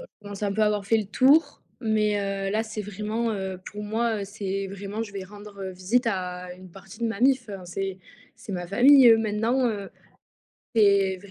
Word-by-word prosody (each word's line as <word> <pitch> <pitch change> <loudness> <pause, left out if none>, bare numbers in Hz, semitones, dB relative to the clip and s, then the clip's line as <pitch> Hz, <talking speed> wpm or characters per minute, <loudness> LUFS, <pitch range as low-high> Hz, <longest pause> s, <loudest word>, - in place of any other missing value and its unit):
je - - -9 0.2
commence 205 0 -9
un 200 -1 0
peu 215 +1 +1
à - - +4
avoir 210 -1 0
fait 220 +3 +2
le 210 - -3
tour, 275 +9 +3 0.2
mais 215 -2 +1
heu, 195 0 -2
là, 215 +2 +1
c'est 215 -1 -6
vraiment, 215 +3 -3
heu, 190 -2 -4
pour 210 - -6
moi, 220 +1 -1
heu, - - -3
c'est 195 -1 -4
vraiment, 200 +3 -5
je 205 -2 -8
vais 195 -1 -5
rendre 205 0 -10
visite 190 +7 0
à 180 -3 -3
une 185 -1 -14
partie 195 +4 -14
de 235 - +1
ma 225 -1 -4
mif, 260 -3 +3
hein 195 -3 -7
c'est 190 +1 -4 0.4
c'est 220 -2 -9
ma 175 -1 -4
famille, 255 +6 +7
eux, 225 -1 +7
maintenant, 225 +4 +1
heu, 200 -3 -4 0.9
c'est 200 -3 +4
vr 200 - -14
205 Hz, 210 wpm, -25 LUFS, 195-225 Hz, 0.9 s, famille